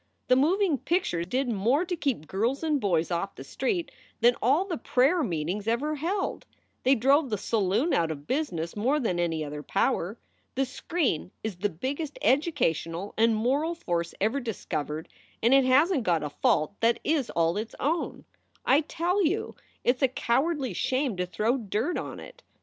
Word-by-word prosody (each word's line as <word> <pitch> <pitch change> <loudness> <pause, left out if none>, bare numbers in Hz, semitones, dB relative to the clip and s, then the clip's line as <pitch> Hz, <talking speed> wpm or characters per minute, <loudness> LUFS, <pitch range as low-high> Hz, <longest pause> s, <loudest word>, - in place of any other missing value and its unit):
The 255 - +6
moving 325 +2 +2
picture 340 - 0
did 255 +9 -1
more 240 - +1
to 355 0 -2
keep 270 - -1
girls 230 - -1
and 300 -4 +1
boys 175 -4 +1
off 175 +3 -2
the - - -8
streets 300 - -2 0.3
than 240 +1 +5
all 285 - +3
the 350 -8 -4
prayer 270 +9 +3
meetings 185 - -2
ever 265 +7 0
held. 370 +7 -2 0.3
They 265 +2 +4
drove 275 +4 +3
the 210 - -1
saloon 215 - +1
out 165 -1 +2
of 145 -2 -6
business 170 - -2
more 255 +8 +1
than 200 -10 -1
any 165 -3 0
other 145 0 -6
power. 180 +7 0 0.4
The 270 +1 +1
screen 265 - -1
is 215 -3 -3
the 205 +3 0
biggest 280 - -4
educational 205 - +1
and 225 0 +3
moral 280 +9 +1
force 170 - -2
ever 220 +8 +1
discovered 160 - -4 0.4
and 235 +3 +5
it 270 -1 +6
hasn 290 +8 +4
t - - 0
got 170 -7 +1
a 150 - -4
fault 155 +4 +1
that 230 +1 +3
is 295 -5 +1
all 165 +1 +1
its 220 +2 -4
own. 320 +5 -1 0.4
I 280 +3 +5
tell 345 +5 0
you 365 +6 -1 0.3
it 245 +1 +3
s - - -22
a 265 - +5
cowardly 260 - 0
shame 260 +4 0
to 180 0 -1
throw 220 +7 0
dirt 225 - -1
on - - -6
it. - - -12
245 Hz, 180 wpm, -27 LUFS, 185-295 Hz, 0.4 s, The